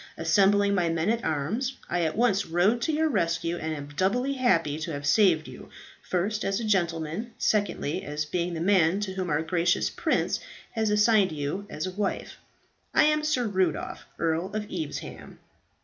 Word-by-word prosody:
Assembling 200 +5 +3
my 175 -4 +1
men 165 +5 +1
at 235 0 -1
arms, 215 - -2
I 175 0 0
at 160 +1 -1
once 220 -4 +2
rode 190 +8 +2
to 315 - 0
your 315 +1 +1
rescue, 170 - 0
and 160 -1 -3
am 145 -1 -7
doubly 245 - +1
happy 165 - +1
to 165 +1 -4
have 145 0 -5
saved 165 -1 +4
you, - - -11 0.3
first, 205 +4 -1
as 195 0 0
a - - -4
gentleman, 175 +2 -1
secondly, 200 -7 0
as 150 +1 -3
being 175 +2 -2
the 160 - -4
man 185 -1 +3
to 195 -2 -3
whom 185 -2 -3
our 150 +1 +1
gracious 175 +1 +1
prince - - 0 0.3
has 220 -1 0
assigned 210 -2 +4
you 155 +7 -4
as 155 - -4
a 185 - -3
wife. 195 +1 -3 0.6
I - - +6
am 305 0 +3
Sir 300 -5 +1
Rudolph, 185 -6 -1
Earl 165 +2 0
of 215 -1 -2
Evesham." 160 -5 -6
185 Hz, 180 wpm, -27 LUFS, 160-215 Hz, 0.6 s, I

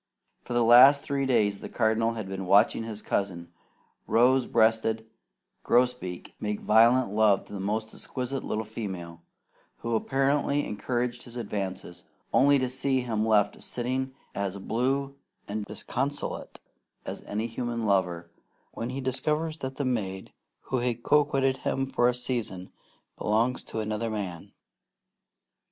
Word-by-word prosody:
For - - -6
the 120 0 +3
last 130 +5 +8
three 140 -1 -1
days 105 -6 +2
the - - -8
Cardinal 115 0 +1
had 110 -4 -5
been 95 -1 -5
watching 105 +4 +4
his 110 -2 -7
cousin, 85 -4 -2 0.6
rose 125 +2 +4
breasted 110 0 +2 0.6
Grosbeak, 125 -8 0
make 105 -1 -2
violent 115 0 +4
love 105 -2 +3
to - - -12
the 100 - -5
most 110 +3 -2
exquisite 130 +1 -4
little 110 - -2
female, 95 -7 -6 0.6
who 115 - -2
apparently 140 +4 +1
encouraged 120 +3 -2
his 120 -1 -12
advances, 95 -6 -5 0.3
only 140 +1 +5
to 130 -1 0
see 130 +1 0
him 110 -3 -1
left 105 -2 +2
sitting 130 +2 -3 0.2
as 100 -1 -3
blue 135 +7 -1 0.3
and 105 0 -3
disconsolate 140 +7 -3 0.5
as - - -6
any 105 +2 -2
human 120 0 -3
lover, 90 -5 0 0.4
when 115 - -5
he 135 +2 -4
discovers 150 +5 -1
that 130 0 -5
the 140 - -2
maid 95 -7 -3 0.3
who 130 - -2
has 120 -1 0
coquetted 135 -3 +3
with - - -19
him 135 - 0
for 125 -2 +2
a 125 - -1
season 115 -7 -3 0.5
belongs 115 +4 +1
to 110 - -4
another 110 +1 -2
man. 95 -6 -5
115 Hz, 140 wpm, -27 LUFS, 105-130 Hz, 0.6 s, last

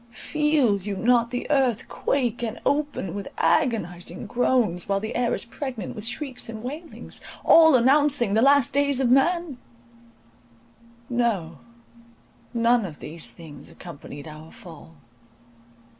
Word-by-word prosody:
Feel 300 -8 +2
you 200 +1 -4
not 235 +1 +2
the 245 0 -4
earth 260 -6 +1
quake 245 -4 -1
and 230 -1 -4
open 285 - -1
with 200 -1 -5
agonizing 180 -7 0
groans, 235 -8 0
while 195 0 +1
the 220 +2 -5
air 240 -1 +1
is - - -4
pregnant 245 -4 -6
with 210 +1 -3
shrieks 250 0 -3
and 220 -1 -7
wailings,— 300 +7 -7 0.2
all 320 -3 +7
announcing 265 -3 +3
the 220 - +3
last 275 0 +4
days 280 -1 +2
of 250 -3 +2
man? 320 0 +2 1.5
No! 225 -10 -1 0.9
none 235 0 +2
of 160 -6 -7
these 160 +2 -5
things 160 -4 -12
accompanied 145 -3 -10
our 155 +1 -11
fall! 165 -1 -14
235 Hz, 130 wpm, -24 LUFS, 195-270 Hz, 1.5 s, all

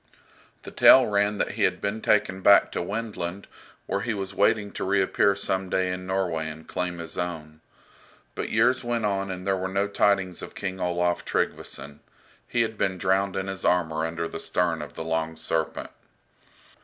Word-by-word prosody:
The - - -9
tale 130 -1 +7
ran 105 -1 +1
that - - -1
he - - -6
had - - +2
been 105 +2 -3
taken 95 -2 +1
back 100 +1 +6
to - - -2
Wendland, 100 -2 -4 0.4
where 100 - -2
he 115 0 -2
was 95 -1 -4
waiting 100 +1 +2
to - - -5
reappear 100 +1 +2
some 95 -1 -2
day 90 0 0
in 90 0 -6
Norway 90 -5 -1
and 80 +1 -10
claim 90 -1 -3
his 85 -1 -6
own. 80 -3 -5 0.7
But - - -4
years 125 +4 +2
went 120 -2 -1
on 100 -1 -1
and 90 -1 -6
there 95 -1 +1
were 95 0 -2
no 100 +2 0
tidings 100 -3 +1
of - - -9
King 95 -1 -4
Olaf 90 -1 0
Tryggveson. 70 +1 -3 0.5
He 120 -1 +2
had 110 -1 -5
been 95 -1 0
drowned 95 +1 +1
in 95 - -2
his 95 -1 -5
armour 80 -3 +1
under 85 0 -2
the 80 - -7
stern 85 -3 0
of 75 -1 -9
the - - -4
"Long 80 0 -1
Serpent." 80 0 -2
95 Hz, 185 wpm, -26 LUFS, 85-100 Hz, 0.7 s, tale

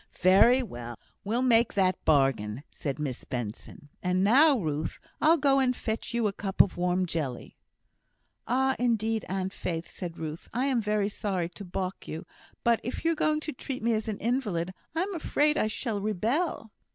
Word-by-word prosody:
"Very 215 +8 +6
well! 120 - -7 0.3
we'll 230 +5 0
make 235 -2 +4
that 185 -2 +2
bargain," 135 -6 +2
said 140 -3 -4
Miss 145 -5 -4
Benson; 120 +4 -6
"and 180 +1 +1
now, 275 +7 +6
Ruth, 155 -6 -2 0.2
I'll 325 +2 +6
go 275 -2 +3
and 255 -1 +2
fetch 220 -1 -3
you 235 -1 0
a 205 - +1
cup 195 -1 -5
of 195 - +6
warm 180 +1 +1
jelly." 150 -8 -4 0.9
"Oh! 265 +2 +2
indeed, 225 -2 +1
Aunt 190 0 -2
Faith," 165 -1 -4
said 175 -2 -7
Ruth, 155 0 -6
"I 250 +3 +1
am 260 -4 +1
very 210 -1 +1
sorry 190 -5 -2
to 190 +3 -9
balk 185 0 -4
you; 160 - -6 0.4
but 235 -1 +3
if 245 +7 -5
you're 330 - +4
going 310 -1 +1
to 310 - -4
treat 255 -1 -6
me 230 0 +2
as 220 0 -1
an 215 -2 -2
invalid, 205 -8 -1 0.2
I 330 - +2
am 395 +1 -4
afraid 300 -2 +1
I 215 - +1
shall 215 -1 -2
rebel." 225 - -1
210 Hz, 180 wpm, -28 LUFS, 175-250 Hz, 0.9 s, Very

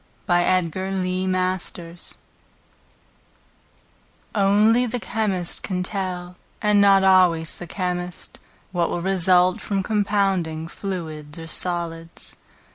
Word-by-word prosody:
Trainor, 175 +1 +3 0.4
the 185 0 -1
Druggist 185 -2 -3 2.2
Only 215 +4 +4
the 245 +2 -2
chemist 205 -7 -1
can 180 -2 -2
tell, 180 -2 -4 0.2
and 210 -2 +3
not 195 -1 +6
always 180 -4 +4
the 175 - -8
chemist, 180 0 -4 0.3
What 175 -2 0
will 170 - -3
result 185 -1 +4
from 195 -2 -1
compounding 195 -6 0
Fluids 160 -6 -6
or 165 - -7
solids. 165 -1 -4
185 Hz, 100 wpm, -23 LUFS, 175-195 Hz, 2.2 s, not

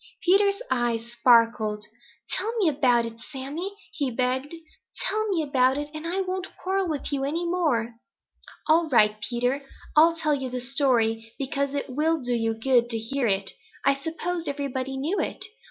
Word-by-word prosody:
Peter's 400 +4 +3
eyes 235 -2 0
sparkled. 230 -3 +3 0.5
"Tell 445 - -1
me 405 -6 +3
about 255 -5 +3
it, 230 0 -8
Sammy," 295 - -6 0.2
he 285 -4 -1
begged. 255 +3 -1 0.5
"Tell 435 -3 -1
me 345 -5 +1
about 265 -2 +2
it, 295 0 -4
and 310 +2 -5
I 370 +3 0
won't 370 0 -3
quarrel 380 0 -1
with 295 -1 -3
you 275 -1 0
any 325 +5 -1
more." 300 -10 0 0.7
"All 320 +1 +4
right, 215 -4 +4
Peter. 245 +4 -1 0.3
I'll 330 +2 +6
tell 310 -2 0
you 265 -2 -2
the 250 0 -3
story, 240 -4 +1
because 280 +1 -2
it 280 - -2
will 310 +5 +1
do 245 -2 -2
you 225 -1 0
good 240 +1 +2
to 230 - -1
hear 240 +3 -1
it. 195 -1 +1 0.3
I 275 - +6
supposed 325 +4 -3
everybody 270 -2 -3
knew 315 +9 -1
it. - - -3
275 Hz, 170 wpm, -26 LUFS, 240-325 Hz, 0.7 s, I'll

